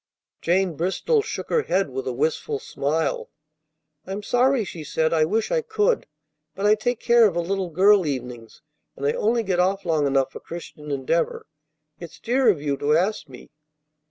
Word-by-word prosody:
Jane 180 +1 +1
Bristol 190 - +1
shook 435 - -6
her 470 - +3
head 190 - 0
with 130 0 -4
a - - 0
wistful 150 +2 -1
smile. 150 +4 -2 0.8
"I'm 195 +2 -5
sorry," 245 0 +2
she 170 -3 -8
said. 160 +2 0
"I 155 -1 +3
wish 215 +7 -1
I - - +2
could. 440 +1 0 0.5
But 195 - -3
I 210 - +6
take 235 +2 -1
care 235 -1 +5
of 185 - -3
a - - +1
little 190 +1 -2
girl 195 +4 +5
evenings, 125 -4 -6 0.3
and 140 - -5
I 145 - +2
only 230 +2 +1
get 185 -3 -1
off 190 +2 +1
long 155 -4 +1
enough 135 -1 +1
for - - -9
Christian 160 -3 -9
Endeavor. 140 +4 -1 0.5
It's 170 -2 -10
dear 250 +1 +2
of 185 -8 +2
you 145 -1 -2
to 150 +2 +2
ask 190 -2 -1
me." 125 -2 -13
180 Hz, 185 wpm, -23 LUFS, 150-215 Hz, 0.8 s, I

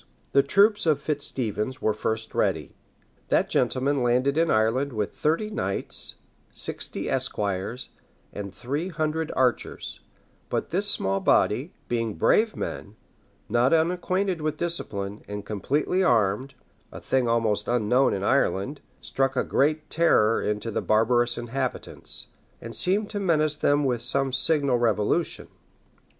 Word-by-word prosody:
The 140 - +5
troops 200 +7 +3
of 150 -3 +3
Fitz 145 -1 -2
Stephens 120 +1 -3
were 110 - +1
first 110 +1 -3
ready. - - 0 0.5
That - - +1
gentleman 135 +1 +1
landed 125 +3 +2
in 165 +1 +2
Ireland 115 +6 +1
with 105 -2 -2
thirty 165 +8 0
knights, 100 - -2 0.4
sixty - - -3
esquires, 100 +5 -2 0.4
and 100 -1 -6
three 140 - -3
hundred 155 -1 -2
archers; 125 -2 -1 0.5
but - - -2
this 200 +4 +1
small 95 - +1
body, - - +2
being 115 -3 -1
brave 220 0 +3
men, 100 - -5 0.5
not 120 +7 +3
unacquainted 180 +2 0
with 155 0 -2
discipline, 105 -12 -3
and 105 0 -6
completely 145 - 0
armed, 120 - +1 0.4
a - - -8
thing 130 -2 0
almost 115 -3 +1
unknown 125 +2 +3
in 95 - -4
Ireland, 135 +2 +1 0.2
struck 135 0 0
a - - +2
great 155 +2 +1
terror 115 -9 +3
into 105 +2 -2
the - - -1
barbarous 120 +2 +2
inhabitants, 125 +2 -4 0.3
and 115 -1 -8
seemed 195 - +1
to 205 - -3
menace 155 -5 +2
them 145 0 +2
with 125 -3 0
some 130 +2 -1
signal 135 -2 +3
revolution. 105 -3 0
130 Hz, 135 wpm, -25 LUFS, 110-155 Hz, 0.5 s, The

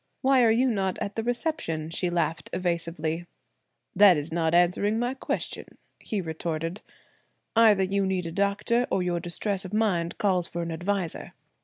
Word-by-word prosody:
"Why 265 -1 +5
are 230 - +5
you 240 +4 +3
not 190 -3 -1
at 200 - -4
the 225 - -1
reception?" 235 - -2
she 180 +2 -1
laughed 165 -2 -1
evasively. 170 -2 -2 0.7
"That 200 -5 +7
is 150 +2 -3
not 165 0 +1
answering 180 +5 +3
my 245 +2 0
question?" - - -5 0.2
he 210 -3 -3
retorted. 165 +2 -4 0.7
"Either 215 -4 +6
you 195 +1 0
need 185 -2 -1
a 165 - -4
doctor 200 +6 +1
or 185 - +1
your 175 -1 -1
distress 185 +3 -1
of 190 +2 -5
mind 180 -6 0
calls 185 -4 +1
for 170 0 -4
an 170 - -4
adviser. 175 +1 -3
185 Hz, 165 wpm, -26 LUFS, 170-210 Hz, 0.7 s, That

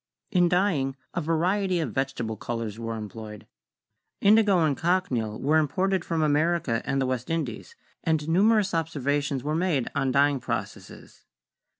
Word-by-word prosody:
In 175 -2 +3
dyeing 170 -8 +1 0.2
a 175 - -1
variety 180 +4 +1
of 140 -10 -3
vegetable 135 -5 -2
colors 115 0 -5
were 115 0 -4
employed. 105 -1 -8 0.7
Indigo 205 -1 +5
and 155 -3 +2
cochineal 135 -12 0
were 155 +3 +3
imported 185 +5 0
from 165 -2 -1
America 150 -5 +1
and 135 0 0
the 130 -1 +1
East 125 -1 -6
Indies, 155 -9 -4 0.3
and 160 -2 0
numerous 200 +3 +3
observations 145 -4 -1
were 150 +1 -1
made 160 -6 0
on 135 -3 0
dyeing 140 +1 +3
processes. - - -6
150 Hz, 140 wpm, -26 LUFS, 130-175 Hz, 0.7 s, Indigo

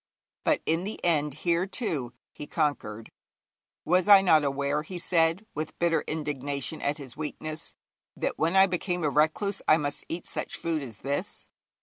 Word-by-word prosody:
But - - +2
in 165 +2 +1
the 210 +3 -5
end 150 -4 +2
here, 170 +2 +2
too, 155 - -2 0.2
he 150 - -8
conquered. 120 -9 -2 0.7
'Was 180 +3 +3
I 200 -2 +9
not 160 -5 +5
aware,' 140 +1 0
he 180 +4 -7
said, 165 +2 +2
with 155 +1 -5
bitter 170 -1 +2
indignation 145 -1 -3
at 145 +1 0
his 135 -4 -9
weakness, 155 +1 -5 0.4
'that - - -2
when 165 +4 +2
I 190 0 +8
became 180 -1 -2
a 150 - +2
recluse 160 +7 +1
I 155 - +7
must 145 -2 -3
eat 170 +1 -4
such - - -3
food 165 -2 -1
as 115 -6 -8
this? 140 +9 -3
155 Hz, 170 wpm, -28 LUFS, 145-175 Hz, 0.7 s, I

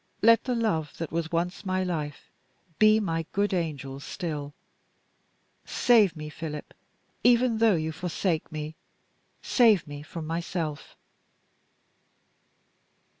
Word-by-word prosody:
Let 230 +1 +6
the 250 -1 0
love 180 -10 -1
that 165 - -4
was 165 0 -2
once 175 +4 -1
my 185 -1 0
life, 155 -5 -4 0.5
be 215 0 +6
my 165 -5 -2
good 200 0 +1
angel 145 -6 -3
still. 145 -2 -5 1.1
Save 215 -8 +4
me, 150 -1 -6
Philip, 150 -1 -7 0.5
even 240 -1 +4
though 225 -3 +5
you 160 -1 -1
forsake 170 0 -2
me 155 0 -5 0.7
save 225 - +4
me 145 -1 -8
from 155 +1 -7
myself!" 165 -2 -4
170 Hz, 115 wpm, -27 LUFS, 155-205 Hz, 1.1 s, Let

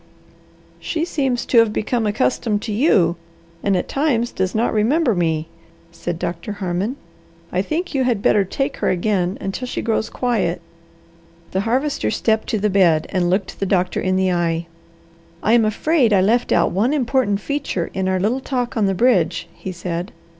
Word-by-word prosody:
"She 325 0 -2
seems 265 -7 -1
to 235 - +4
have 230 -2 +4
become 220 +1 -1
accustomed 210 - 0
to 225 - -4
you, 195 - +3 0.4
and 200 -2 +1
at - - -2
times 255 -5 0
does 185 +1 -2
not 230 +2 +1
remember 240 +5 +2
me," 160 -3 0 0.4
said 170 0 -4
Doctor 170 +4 -4
Harmon. 195 +4 -2 0.6
"I 180 - +1
think 320 - -3
you 270 -2 +1
had 235 -5 0
better 205 -1 +4
take 270 +8 -3
her - - 0
again 185 0 0
until 195 +6 -4
she - - -4
grows 220 -1 0
quiet." 210 -9 -1 0.9
The 190 - 0
Harvester 260 - 0
stepped 220 - 0
to 220 - 0
the 210 +1 +1
bed 175 -6 +3
and 180 -2 0
looked 190 +2 -1
the 195 - -1
doctor 180 -1 +1
in 185 0 0
the 190 0 +2
eye. 170 -1 0 0.8
"I 220 - +3
am 235 -2 +5
afraid 240 +2 +2
I 190 - +5
left 235 +5 +2
out - - +3
one 220 +9 +1
important 250 -6 +1
feature 280 -10 -3
in 190 0 -1
our 190 0 +1
little 225 +8 0
talk 250 -3 -2
on 215 -3 +2
the 195 - 0
bridge," 180 -8 +2
he 190 - -7
said. 175 +1 -4
205 Hz, 180 wpm, -20 LUFS, 180-245 Hz, 0.9 s, am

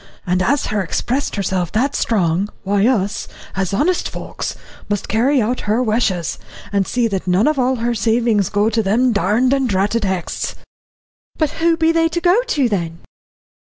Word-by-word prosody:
And 180 +1 +1
as 280 +10 +1
her 210 -1 -1
expressed 250 - -2
herself 185 -4 -1
that 255 +6 +1
strong, 190 -3 +1
why 200 +2 +2
us, 205 -6 0 0.3
as 190 -1 -1
honest 330 - +1
folks, - - -5 0.3
must 205 -2 -2
carry 255 +6 +2
out 240 +2 0
her 230 +4 +2
wishes, 215 -7 0 0.3
and 195 -2 +1
see 245 -2 +1
that 195 -3 -3
none 185 +7 +3
of 305 -2 +1
all 255 +1 +2
her 240 0 -1
savings 225 -2 +1
go 205 +1 +1
to 225 +1 +1
them 230 +5 +2
darned 215 +7 +2
and 270 -2 +1
dratted 205 +4 +1
Hexts." 190 -3 -2 0.8
"But 310 -3 +1
who 330 0 +3
be 325 0 +3
they 330 0 +2
to 340 +1 -2
go 360 +6 +3
to, 305 - +1
then?" 170 -6 -3
220 Hz, 175 wpm, -19 LUFS, 195-260 Hz, 0.8 s, none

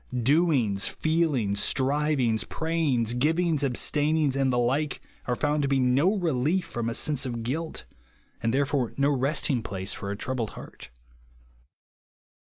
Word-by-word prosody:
Doings, 135 - +2
feelings, 145 -11 0
strivings, 135 -4 +1
pra3'ings, 150 -8 0
giviiigs, 160 +2 +1
abstainings, 145 +2 +1
and 135 -1 +1
the 125 - 0
like, 135 +5 0 0.3
are 125 - +1
found 150 +3 0
to 140 - 0
be 135 -1 +2
no 135 +10 +3
relief 165 0 0
from 115 -1 -3
a 115 - -4
sense 145 -3 0
of 120 -2 -4
guilt, 155 +7 -3 0.6
and, 115 - 0
therefore, 135 -2 0
no 140 +1 +3
resting 135 -1 +1
place 95 -3 -3
for 100 - -6
a 100 - -3
troubled 120 -2 -2
heart. - - -11
135 Hz, 140 wpm, -26 LUFS, 120-155 Hz, 0.6 s, no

